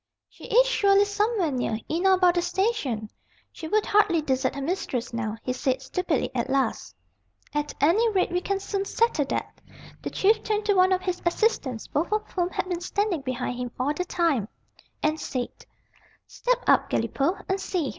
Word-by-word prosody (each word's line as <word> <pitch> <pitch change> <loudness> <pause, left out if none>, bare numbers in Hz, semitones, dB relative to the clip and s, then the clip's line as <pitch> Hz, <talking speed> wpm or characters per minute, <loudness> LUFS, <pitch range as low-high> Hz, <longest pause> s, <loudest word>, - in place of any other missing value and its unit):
"She - - -14
is - - +5
surely 400 -4 +4
somewhere 410 -4 0
near, 245 -4 -1
in 345 +5 +1
or 380 - +6
about 365 -1 +4
the 350 - +1
station. 350 - -1 0.4
She 320 - -8
would 425 +5 +2
hardly 405 -5 +3
desert 265 -2 0
her 280 - -4
mistress 270 -8 -2
now," 225 -1 -3
he 255 - -1
said, 260 0 0
stupidly, 325 +2 -1
at 250 0 -2
last. 270 0 -1 0.6
"At 295 0 -2
any 390 +11 +4
rate 380 -4 +1
we 355 0 0
can 395 +1 -1
soon 395 0 -2
settle 425 -9 +1
that." - - -4 0.4
The - - -4
Chief 435 +3 +2
turned 425 -1 -1
to 415 - +3
one 370 0 +4
of 370 0 +2
his 365 -1 -2
assistants, 340 - 0
both 315 +7 -2
of 430 0 0
whom 355 -1 0
had 370 - -3
been 350 -2 -3
standing 385 -3 -1
behind 255 -1 -3
him 245 -1 -4
all 275 +4 +1
the 360 - -2
time, 330 - 0 0.6
and 310 +1 +1
said: 250 -2 -5 0.6
"Step - - -1
out, - - +4
Galipaud, 350 +8 -1
and 385 0 -1
see. 340 -9 -1
355 Hz, 185 wpm, -26 LUFS, 270-400 Hz, 0.6 s, or